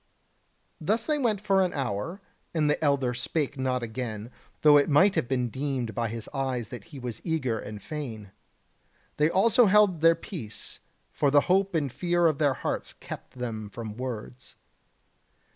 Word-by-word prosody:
Thus 215 +8 0
they 305 -1 +1
went 225 -6 +1
for 195 -1 +3
an 180 - -1
hour, 135 - -3 0.3
and 155 -2 +2
the 150 - +1
elder 140 -4 +2
spake 145 +4 -2
not 130 -1 0
again, 115 -1 -5 0.3
though 150 -1 +8
it 145 +1 +5
might 185 +7 +5
have 120 - 0
been 125 -2 0
deemed 130 -2 -2
by 115 +2 -1
his 115 0 -6
eyes 130 -5 -2
that 120 -5 -8
he 145 - -11
was 120 -4 -5
eager 135 -9 -1
and 105 0 -7
fain. 110 -3 -6 0.9
They 150 +1 +4
also 225 +6 +5
held 195 -4 +4
their 165 0 +6
peace; 125 - -8 0.3
for 145 - +2
the 145 +1 +6
hope 195 +2 +2
and 145 -5 0
fear 175 +3 +1
of 155 -3 +3
their 145 -3 +3
hearts - - -3
kept - - -10
them 110 -4 -4
from 110 0 -7
words. 125 0 -6
140 Hz, 170 wpm, -27 LUFS, 120-165 Hz, 0.9 s, though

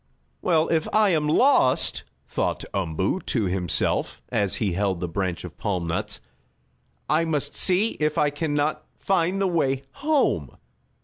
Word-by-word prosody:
"Well, 165 -3 +2
if 160 -2 +1
I 215 -1 +4
am 155 -4 +1
lost," 150 - +3 0.3
thought - - -2
Umboo 95 - -1
to 115 - 0
himself, 90 -2 0
as 100 -2 0
he 105 -4 0
held 95 -1 0
the 90 - -2
branch 90 0 -3
of - - -10
palm 90 -4 -1
nuts, 85 0 -2 0.9
"I 155 +2 +2
must 150 -3 -1
see 190 +4 +3
if 150 0 0
I 145 -1 +3
can 145 0 -2
not 150 +1 0
find 190 0 +1
the 195 - +2
way 135 -6 0
home." 295 - 0
145 Hz, 150 wpm, -24 LUFS, -, 0.9 s, I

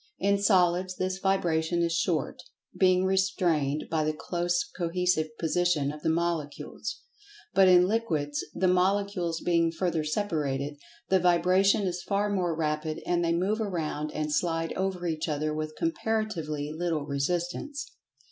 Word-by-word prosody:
In 200 +1 +2
solids 185 -2 +3
this 185 +1 -2
vibration 170 -3 +1
is 170 0 0
short, 165 -3 -1 0.3
being 185 -1 +3
restrained 175 -7 +1
by 160 -1 0
the 155 0 0
close 175 +1 0
cohesive 175 -2 +1
position 165 -3 +1
of 150 0 -9
the 160 - 0
Molecules. 165 +4 -3 0.5
But 195 -1 +6
in 180 0 +6
Liquids, 155 -10 -1
the 185 - +2
Molecules 185 -2 +1
being 170 -1 +2
further 165 -2 -1
separated, 150 -5 -2 0.3
the 190 - +4
vibration 180 +3 +3
is 180 -2 -2
far 205 +2 0
more 180 -4 0
rapid, 155 0 -1
and 175 -1 +1
they 170 0 +1
move 200 +6 0
around 155 -6 -2
and 150 -1 -2
slide 165 +1 0
over 190 -2 -2
each 160 -1 -2
other 150 +1 -1
with 155 0 -4
comparatively 215 - -2
little 165 -3 -1
resistance. 175 - -2
175 Hz, 140 wpm, -28 LUFS, 155-185 Hz, 0.5 s, But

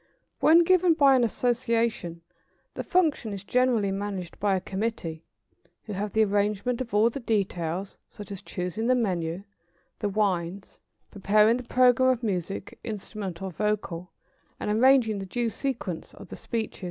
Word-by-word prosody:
] - - -46
When 330 +2 +6
given 360 -1 +4
by 280 -4 +6
an 250 - +3
association, 230 -7 0 0.5
the - - -4
function 310 - +1
is 195 -1 -7
generally 235 -2 +2
managed 195 -3 -5
by 200 -1 +2
a - - 0
committee, 190 -5 -4 0.6
who 210 - -7
have 205 +2 -3
the 220 - +4
arrangement 205 +4 0
of 235 -4 -4
all 220 +3 +4
the 275 - -5
details, 190 -5 -2
such 205 -1 -11
as 195 -1 -6
choosing 190 +4 -3
the 255 - +4
menu, 180 -6 -1 0.6
the 205 - -1
wines, 190 -2 -2 0.3
preparing 210 +3 +3
the 250 - -6
programme 255 +1 +4
of 250 -2 0
music, 195 -2 -3
instrumental 195 -3 -5
or - - -10
vocal, 180 -3 -2 0.5
and 210 - -2
arranging 230 -2 +4
the 195 - -5
due 235 +3 -1
sequence 225 - -4
of - - -12
the - - -7
speeches. 225 -2 -4
210 Hz, 160 wpm, -27 LUFS, 190-240 Hz, 0.6 s, When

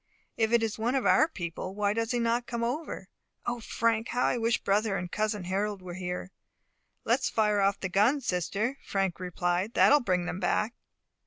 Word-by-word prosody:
If 220 0 +1
it 235 -1 +4
is 220 -1 -2
one 240 +4 0
of 265 - 0
our 310 - +5
people, 185 - -6
why 205 0 +1
does 230 0 -1
he 245 - 0
not 235 +1 0
come 235 -1 -3
over? 275 +8 -3 0.4
O 240 0 -2
Frank, 230 0 0
how 245 - 0
I - - +1
wish 230 0 +2
brother 200 0 +1
and 175 -1 -5
cousin 210 -2 -1
Harold 195 +2 -2
were 180 -1 -7
here." 180 0 -5 0.7
"Let - - +3
us - - -1
fire 210 -2 +2
off 195 0 +2
the 190 - -2
gun, 210 +10 +3
sister," 215 - -2
Frank 195 -3 -1
replied, 180 +3 -1
"that - - +6
will 295 - +7
bring 185 -8 0
them 180 - -4
back." 210 +4 0
210 Hz, 200 wpm, -29 LUFS, 185-235 Hz, 0.7 s, will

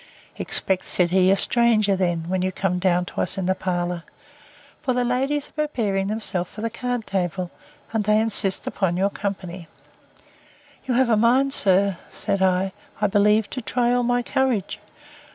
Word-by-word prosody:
Expect, 190 -1 0
said 175 -1 +2
he, 185 0 +4
a 195 - +4
stranger 220 -4 +3
then, 175 -3 -1
when 185 +1 -1
you 185 0 0
come 180 -1 -1
down 180 -1 +1
to - - -4
us 180 - -1
in 190 - -2
the 185 - +2
parlour; 175 -2 -2 0.8
for 260 -3 0
the 250 - +1
ladies 270 +4 -1
are 305 -1 -2
preparing 200 -8 -1
themselves 200 -4 -1
for 210 - -9
the 230 0 -2
card 245 -1 -3
table, 180 -1 -2 0.4
and 220 -2 0
they 215 +1 +4
insist 210 -3 +1
upon 180 -3 -1
your 195 +2 +1
company.—You 190 +5 -8
have 250 -1 +3
a - - +5
mind, 255 +5 +3
sir, 195 -3 +3
said 195 - -2
I, 190 0 +2 0.3
I 210 - +1
believe, 210 +1 +3
to 255 - -4
try 240 +1 0
all 245 - +2
my 245 0 +1
courage. 245 -7 -1
200 Hz, 170 wpm, -23 LUFS, 185-235 Hz, 0.8 s, a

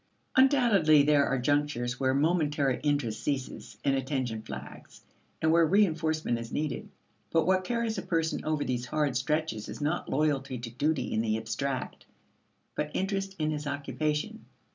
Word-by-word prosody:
Undoubtedly 235 - +5
there 145 -1 +4
are 135 - +1
junctures 125 -2 0
where 130 -1 +2
momentary 150 -3 +1
interest 145 -7 0
ceases 135 -3 -4
and 140 - +3
attention 130 -4 -2
flags, 70 -8 -10 0.4
and 160 - +4
where 165 +1 +5
reinforcement 160 - +2
is 115 +1 -7
needed. 150 0 -3 0.4
But 165 - +2
what 185 0 +3
carries 230 0 -1
a - - -3
person 165 -3 -1
over 155 -2 0
these 125 -1 -2
hard 145 -2 0
stretches 145 -5 -1
is 105 - -7
not 150 +3 -1
loyalty 140 -3 0
to 115 -1 -7
duty 135 0 -1
in 110 - +1
the 110 -1 0
abstract, 125 +4 -4 0.7
but 150 - -2
interest 195 0 -1
in 155 -1 0
his 150 -1 -4
occupation. 150 +8 -2
150 Hz, 155 wpm, -29 LUFS, 130-160 Hz, 0.7 s, Undoubtedly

